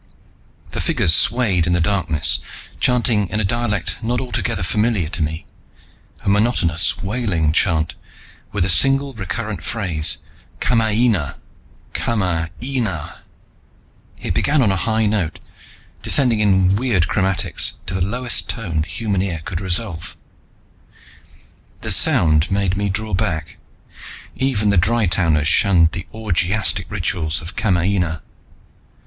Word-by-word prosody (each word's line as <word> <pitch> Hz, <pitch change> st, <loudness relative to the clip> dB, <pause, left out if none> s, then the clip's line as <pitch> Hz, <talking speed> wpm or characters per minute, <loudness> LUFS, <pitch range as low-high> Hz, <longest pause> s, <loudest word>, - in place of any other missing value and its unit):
The -, -, -3 dB
figures 80 Hz, -, +2 dB
swayed 100 Hz, -5 st, +3 dB
in 85 Hz, -, +1 dB
the 90 Hz, -, +2 dB
darkness, 85 Hz, -4 st, +1 dB, 0.4 s
chanting 120 Hz, -5 st, +2 dB
in 105 Hz, -, -1 dB
a -, -, +1 dB
dialect 105 Hz, 0 st, -1 dB
not 120 Hz, +2 st, -1 dB
altogether 110 Hz, -7 st, -2 dB
familiar 105 Hz, -1 st, 0 dB
to 90 Hz, -, -2 dB
me, 80 Hz, +1 st, -3 dB, 0.8 s
a -, -, -10 dB
monotonous 100 Hz, -6 st, +2 dB
wailing 95 Hz, -8 st, 0 dB
chant, 80 Hz, 0 st, +1 dB, 0.6 s
with 100 Hz, -3 st, 0 dB
a -, -, 0 dB
single 135 Hz, -, +3 dB
recurrent 100 Hz, -2 st, -5 dB
phrase: 90 Hz, -10 st, -1 dB, 0.4 s
"Kamaina! 110 Hz, -, +1 dB, 0.6 s
Kama 90 Hz, -8 st, -1 dB
aina!" 115 Hz, -, -3 dB, 1.0 s
It -, -, -2 dB
began 145 Hz, -2 st, +2 dB
on 105 Hz, -, +3 dB
a -, -, +1 dB
high 110 Hz, +3 st, 0 dB
note, 100 Hz, -7 st, -1 dB, 0.6 s
descending 125 Hz, -6 st, +3 dB
in 95 Hz, -2 st, +3 dB
weird 105 Hz, -8 st, +1 dB
chromatics 95 Hz, 0 st, 0 dB
to 95 Hz, -, -3 dB
the 95 Hz, -, -2 dB
lowest 120 Hz, +6 st, 0 dB
tone 85 Hz, -9 st, -2 dB
the 80 Hz, -, -4 dB
human 100 Hz, -4 st, -2 dB
ear 85 Hz, -5 st, -3 dB
could 95 Hz, -1 st, -4 dB
resolve. 90 Hz, -4 st, -2 dB, 1.6 s
The -, -, -1 dB
sound 75 Hz, -2 st, +4 dB
made 95 Hz, -1 st, 0 dB
me 100 Hz, 0 st, -1 dB
draw 110 Hz, +2 st, -3 dB
back. 80 Hz, -4 st, -2 dB, 0.8 s
Even 120 Hz, -6 st, 0 dB
the 100 Hz, -, +2 dB
Dry 110 Hz, +5 st, +2 dB
towners 80 Hz, -4 st, +1 dB
shunned 85 Hz, -1 st, +4 dB
the 90 Hz, -1 st, -6 dB
orgiastic 95 Hz, -3 st, 0 dB
rituals 85 Hz, -5 st, -1 dB
of 80 Hz, -, -9 dB
Kamaina. 90 Hz, -4 st, 0 dB
95 Hz, 130 wpm, -19 LUFS, 85-110 Hz, 1.6 s, sound